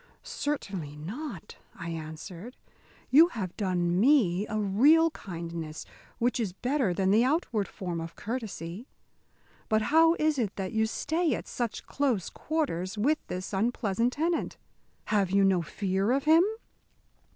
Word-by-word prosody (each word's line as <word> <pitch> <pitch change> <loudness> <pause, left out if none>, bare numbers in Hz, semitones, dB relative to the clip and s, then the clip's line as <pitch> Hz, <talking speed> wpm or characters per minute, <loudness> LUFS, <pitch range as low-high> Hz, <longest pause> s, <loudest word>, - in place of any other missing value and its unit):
"Certainly 195 - -4
not," 195 - -7 0.2
I 165 - -6
answered, 165 +7 -8 0.5
"you 315 +5 +8
have 200 - -5
done 180 -3 0
me 210 -7 +4
a 215 - -3
real 280 +12 +4
kindness, 165 - -6 0.3
which 245 +1 +1
is 205 -6 -1
better 250 0 0
than 190 +2 +1
the 220 +3 +5
outward 255 - 0
form 175 -3 -5
of 165 0 -7
courtesy. 220 -3 -5 0.8
But 215 0 +2
how 325 +1 +6
is 305 -3 +1
it 210 -5 -1
that 190 -2 -4
you 220 0 +2
stay 320 +4 0
at - - -7
such 235 -3 -3
close 255 -10 -1
quarters 220 - -2
with 290 +9 +2
this 185 +3 -5
unpleasant 230 +2 0
tenant? 330 +3 -1 0.6
Have 200 -3 +3
you 195 +1 +3
no 190 -2 +3
fear 195 +6 -1
of 275 +1 +1
him?" 320 +3 +6
210 Hz, 140 wpm, -28 LUFS, 185-270 Hz, 0.8 s, you